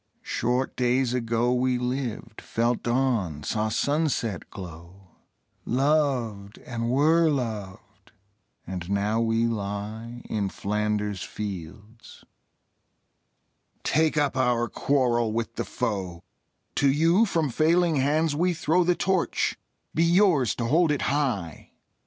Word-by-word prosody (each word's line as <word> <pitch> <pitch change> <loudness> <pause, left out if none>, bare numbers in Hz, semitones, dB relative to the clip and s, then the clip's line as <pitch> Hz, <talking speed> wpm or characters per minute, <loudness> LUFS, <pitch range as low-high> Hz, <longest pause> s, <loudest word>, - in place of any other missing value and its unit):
Short 125 +3 -1
days 125 0 +1
ago 120 0 +1
We 125 0 +1
lived, 125 -3 -4
felt 115 +1 0
dawn, 120 - 0
saw 110 +5 -1
sunset 135 - -1
glow, 90 +1 -11 0.5
Loved, 125 -7 0
and 115 -1 -3
were 160 +5 +4
loved, 110 -9 -5 0.5
and 90 -1 -6
now 105 +3 +1
we 115 0 +1
lie 110 +2 -4
In 100 -3 -1
Flanders 105 -1 -2
fields. 105 +2 -8 1.6
Take 155 +1 +2
up 145 -3 +1
our 125 -2 +2
quarrel 120 -6 +1
with 115 0 -2
the - - -3
foe: 95 -8 -3 0.5
To 140 - +4
you 165 +9 +3
from 160 -7 0
failing 165 +3 +3
hands 145 +3 +1
we 175 +3 +1
throw 165 +3 +2
The 175 +1 +2
Torch: 185 -1 0 0.4
be 165 - +2
yours 170 - +3
to 120 - -2
hold 160 +6 +3
it 145 - -1
high! 115 - -2
120 Hz, 115 wpm, -26 LUFS, 105-145 Hz, 1.6 s, were